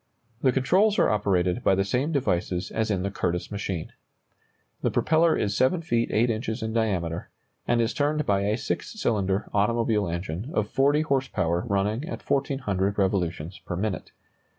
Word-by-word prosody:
The 130 - +4
controls 185 +12 +3
are - - +4
operated 95 -1 +1
by 95 - +4
the 95 - +2
same 125 +10 0
devices 90 - -1
as 110 0 -1
in 95 -3 0
the 100 - -2
Curtiss 90 -1 -2
machine. 100 -5 -4 0.9
The - - +1
propeller 160 +1 +3
is 100 -1 -1
7 165 +7 +2
feet 120 -7 0
8 115 +2 +3
inches 110 +1 -3
in 110 0 -3
diameter, 90 -7 -1 0.4
and 120 0 +2
is 115 0 +1
turned 150 +2 0
by 100 -1 +2
a 105 +2 +1
six 220 - -4
cylinder 100 - 0
automobile 105 0 +2
engine 85 - -4
of 105 - +1
40 145 +3 +3
horse 135 -4 0
power 85 -1 -1
running 105 +4 0
at - - -7
1,400 115 -9 0
revolutions 90 -3 -1
per 90 - -5
minute. 100 +1 -3
105 Hz, 170 wpm, -26 LUFS, 95-130 Hz, 0.9 s, The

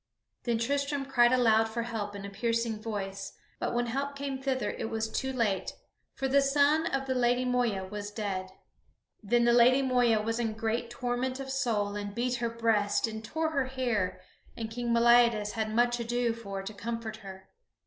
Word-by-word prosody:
Then 235 -2 +1
Tristram 280 +3 -1
cried 245 -3 +4
aloud 225 -3 +4
for 235 +1 -2
help 215 -3 -4
in 200 0 -6
a - - -5
piercing 230 +1 -1
voice; 195 -3 -5 0.3
but - - -2
when 240 0 +1
help 275 +4 -3
came 275 -1 -4
thither 260 -5 -1
it 225 - -4
was 225 0 -1
too 265 +4 -2
late, 225 -7 0 0.4
for 270 - -1
the 280 +1 +4
son 290 +4 +3
of 270 -3 -1
the 260 - 0
Lady 250 0 +2
Moeya 240 -6 0
was 205 +1 -5
dead. 200 -3 -3 0.7
Then 235 +3 +2
the 240 - +5
Lady 250 +3 +6
Moeva 245 -4 +3
was 225 +2 -1
in 225 -2 -1
great 225 +1 -2
torment 250 +1 -2
of 270 -1 -5
soul, 220 -7 0
and 205 0 -5
beat 245 +1 0
her 235 0 -1
breast 225 -3 +1
and 220 -1 -6
tore 320 +7 -2
her 275 -4 +1
hair 240 -8 -1 0.4
and 225 -1 -4
King 240 +1 -2
Meliadus 235 -2 +4
had 220 -1 -2
much 240 +2 +2
ado 240 0 0
for 200 -4 -6
to 205 +3 -6
comfort 225 +1 -5
her. 190 -2 -11
235 Hz, 190 wpm, -29 LUFS, 215-255 Hz, 0.7 s, Lady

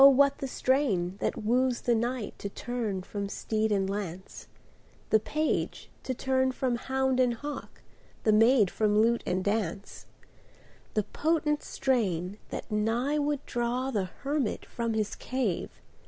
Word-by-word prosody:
what 280 +1 +4
the 270 - -2
strain 245 -10 +1
that - - -2
woos 250 +3 +2
the 240 - +2
knight 235 0 -1
To 200 - -4
turn 220 -4 -3
from 200 +1 -4
steed 220 +1 -1
and 195 -2 +2
lance, 190 -2 -5 0.6
The 220 - +6
page 305 +8 -1
to 260 - -3
turn 260 +1 +1
from 255 -2 0
hound 265 +1 0
and 250 -2 +3
hawk, 290 +4 -7 0.4
The 215 - +4
maid 225 -2 +5
from 210 -1 +2
lute 235 +2 +3
and 185 +1 0
dance; 200 -2 -2 0.9
The 215 - +3
potent 300 +5 0
strain, 200 -7 0
that - - -6
nigh 235 +8 +1
would 290 -1 -1
draw 245 +2 -1
The 205 -6 0
hermit 275 +5 -2
from 230 -1 -2
his 215 -1 0
cave. 250 -9 -2
235 Hz, 145 wpm, -29 LUFS, 210-265 Hz, 0.9 s, The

